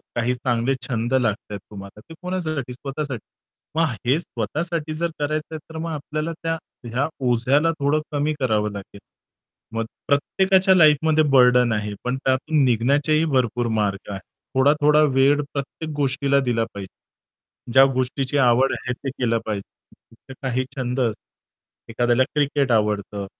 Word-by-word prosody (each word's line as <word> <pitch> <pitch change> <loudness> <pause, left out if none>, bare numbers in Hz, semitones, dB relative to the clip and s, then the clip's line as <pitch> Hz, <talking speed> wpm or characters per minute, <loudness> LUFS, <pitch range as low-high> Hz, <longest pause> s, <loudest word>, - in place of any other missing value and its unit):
काही 120 +1 +1
चांगले 125 +1 0
छंद 120 0 -2
लागतायेत 110 -5 -1
तुम्हाला 100 0 -10
ते - - -9
कोणासाठी? 155 -8 -3
स्वतःसाठी. 135 -2 -5 0.5
मग 165 +1 +3 0.2
हे 130 +6 +3
स्वतःसाठी 155 +4 -3
जर 170 +2 -2
करायचं 155 +2 -2
आहे - - -5
तर - - -6
मग 165 +1 -3
आपल्याला 155 +1 -4
त्या 165 0 -1 0.3
ह्या 125 +5 -1 0.2
ओझ्याला 135 +7 +3
थोडं 145 +2 +1
कमी 150 +1 0
करावं 110 -5 +1
लागेल. 100 0 -9 0.8
मग 115 0 -1 0.2
प्रत्येकाच्या 190 +6 +3
लाईफमध्ये 155 -1 +5
बर्डन 125 -2 +5
आहे, 105 -1 -2
पण 125 +1 -1
त्यातून 140 +3 +2
निघण्याचेही 140 +6 +2
भरपूर 125 -5 0
मार्ग 100 -2 -1
आहेत. 95 -1 -5 0.3
थोडा-थोडा 150 +3 +4
वेळ 140 +2 +4
प्रत्येक 145 +3 -5
गोष्टीला 140 0 +1
दिला 120 -4 0
पाहिजे. 100 +4 -14
ज्या 135 0 +8
गोष्टीची 130 +2 -1
आवड 130 0 +4
आहे 125 - -3
ते 135 +2 -6
केलं 120 -3 0
पाहिजे, 105 -2 -7 0.3
तर - - -7
काही 130 -1 -1
छंद 125 0 -2
असतात, 115 -1 -7
एखाद्याला 120 +2 +2
क्रिकेट 145 -2 +1
आवडतं 105 -2 0
130 Hz, 140 wpm, -22 LUFS, 120-150 Hz, 0.8 s, ज्या